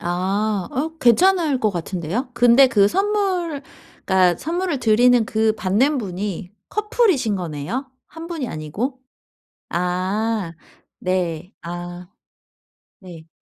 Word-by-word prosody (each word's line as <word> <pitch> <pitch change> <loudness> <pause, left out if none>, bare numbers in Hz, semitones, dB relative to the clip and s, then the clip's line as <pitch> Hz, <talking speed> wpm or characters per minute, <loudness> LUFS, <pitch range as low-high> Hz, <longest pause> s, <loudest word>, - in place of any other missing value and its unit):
아. 190 +3 -1
어 310 +4 -3
괜찮을 310 +2 +3
것 215 - +2
같은데요. 185 - -3
근데 245 +3 +6
그 205 -6 +4
선물 375 - 0 0.4
그러니까 185 -3 +3
선물을 345 -2 -2
드리는 235 +1 +4
그 220 0 +2
받는 240 +10 +1
분이 190 -2 -4 0.2
커플이신 415 - +1
거네요 180 - -4 0.2
1 325 0 -10
분이 320 -8 -4
아니고? 210 - -4 0.7
아 185 +2 -1 0.5
네. 180 -1 -2
아. 175 +1 -7 0.9
네. 170 -4 -12
220 Hz, 205 characters per minute, -21 LUFS, 180-275 Hz, 0.9 s, 근데